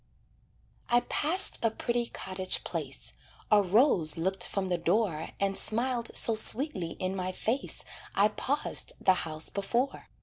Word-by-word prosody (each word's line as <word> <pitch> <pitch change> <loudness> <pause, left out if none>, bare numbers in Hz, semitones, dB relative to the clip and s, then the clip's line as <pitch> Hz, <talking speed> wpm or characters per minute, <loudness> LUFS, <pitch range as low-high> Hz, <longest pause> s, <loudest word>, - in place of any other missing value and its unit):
I 240 0 +4
passed 330 +5 +2
a 225 - +3
pretty 235 +1 -2
cottage 185 -3 -3
place, - - -6 0.4
A 210 -1 +6
rose 185 - +3
looked 185 +2 -1
from 195 -1 -3
the 175 -1 -1
door 170 -2 0
And 195 0 0
smiled 235 +2 0
so 230 - +5
sweetly 215 - +2
in 185 +1 -4
my 185 -1 -3
face 230 +8 -3 0.3
I 205 +2 +4
paused 280 +7 -1
the 190 - +4
house 155 -3 +2
before. 235 +7 -2
200 Hz, 140 wpm, -29 LUFS, 185-235 Hz, 0.4 s, A